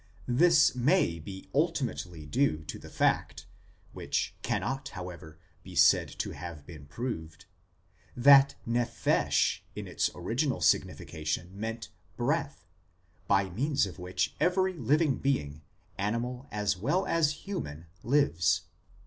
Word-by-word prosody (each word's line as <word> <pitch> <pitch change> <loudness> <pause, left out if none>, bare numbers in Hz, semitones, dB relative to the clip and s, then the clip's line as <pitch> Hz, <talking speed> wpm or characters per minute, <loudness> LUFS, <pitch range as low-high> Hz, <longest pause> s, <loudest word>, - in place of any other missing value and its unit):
this 155 +5 +5
may 125 - +2
be 95 +4 -9
ultimately 130 - -1
due 80 - +1
to - - -7
the - - -11
fact - - 0 0.5
(which - - -2
cannot, 135 0 -2
how 90 -1 -6
ever, 80 -2 -12 0.2
be - - -11
said - - +5
to - - -5
have 75 -1 -8
been 75 -4 -11
proved) 80 - -6 0.7
that 140 +2 +7
nephesh 120 0 +1 0.2
in - - -6
its - - 0
original 120 - -1
signification 75 +2 0
meant 115 +3 -5
" - - -34
breath," 140 - -1 0.6
by 95 0 +3
means 135 - +1
of 95 -1 -9
which 90 +1 -2
every 185 +1 +2
living 150 0 +1
being, 75 - -1 0.4
animal 120 +6 -2
as 105 -1 0
well 145 - 0
as 155 -3 +1
human, 80 - -5 0.2
lives. 95 - +2
115 Hz, 125 wpm, -29 LUFS, 85-140 Hz, 0.7 s, that